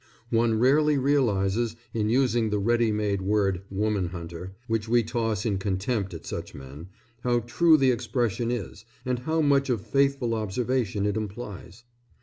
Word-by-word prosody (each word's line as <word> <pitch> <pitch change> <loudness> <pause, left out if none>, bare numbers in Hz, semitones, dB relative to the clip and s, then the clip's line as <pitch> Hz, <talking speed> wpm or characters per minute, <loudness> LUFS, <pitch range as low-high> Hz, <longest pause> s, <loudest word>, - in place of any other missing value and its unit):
One 115 -1 +2
rarely 145 +5 +4
realizes, 115 -5 +1 0.2
in 110 -2 0
using 120 -2 +2
the 105 - 0
ready 115 +2 +2
made 105 -2 -1
word 95 -2 +1
"woman 100 -1 0
hunter," 85 +2 -8
which 115 -2 -2
we 120 0 +4
toss 115 -2 -2
in 100 -4 0
contempt 100 +1 -1
at 80 - -9
such - - -6
men, 70 +5 -10 0.4
how 120 -1 +2
true 155 +8 +4
the 135 -3 +4
expression 120 -2 -1
is 115 -4 -4 0.2
and 125 -1 -1
how 160 +5 0
much 140 -2 +3
of 115 -6 -1
faithful 140 -4 +1
observation 110 -1 -1
it 105 -1 0
implies. 105 0 -7
115 Hz, 155 wpm, -26 LUFS, 100-125 Hz, 0.4 s, rarely